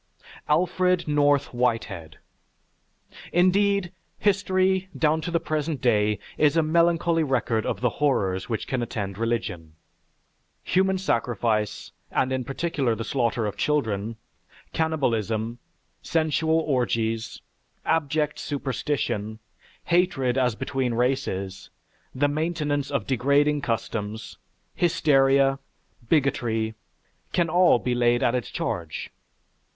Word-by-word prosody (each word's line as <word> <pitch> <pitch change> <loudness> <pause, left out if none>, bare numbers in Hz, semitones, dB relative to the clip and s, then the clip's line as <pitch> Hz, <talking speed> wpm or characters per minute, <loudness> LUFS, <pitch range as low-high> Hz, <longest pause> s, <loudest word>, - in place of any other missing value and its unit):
ALFRED 180 +2 +2
NORTH 145 -2 +2
WHITEHEAD 110 -10 -2 1.1
Indeed, 190 +1 +3 0.3
history, 190 -2 +1
down 155 0 +2
to 170 - -4
the 170 -1 +1
present 155 -2 -2
day, 105 -3 +2 0.2
is 150 +1 +4
a 165 - +4
melancholy 170 +1 +2
record 120 -5 0
of - - -2
the 125 - +3
horrors 95 -10 +1
which 110 - -2
can 130 -2 -2
attend 100 -4 -4
religion: 100 -9 -3 0.9
human 190 +1 +2
sacrifice, 115 - -1 0.2
and, 130 0 0
in 130 -1 -1
particular, 135 -2 -1
the 115 - -4
slaughter 120 -2 0
of 105 - -3
children, 110 -7 0 0.6
cannibalism, 115 -8 -1 0.4
sensual 160 0 +1
orgies, 115 -6 -1 0.5
abject 150 -1 0
superstition, 135 -6 -2 0.5
hatred 170 -8 +1
as 125 -4 +1
between 125 0 -2
races, 100 -6 -1 0.5
the 145 +3 +2
maintenance 150 -2 -1
of 140 -8 -1
degrading 140 +3 +2
customs, 110 -2 -4 0.3
hysteria, 135 -4 +3 0.5
bigotry, 115 -7 +1 0.6
can 170 -2 +2
all 175 -3 +5
be 125 +1 -2
laid 120 0 +2
at 120 - +3
it's 125 -4 -2
charge. 85 -2 -4
135 Hz, 105 wpm, -25 LUFS, 115-160 Hz, 1.1 s, all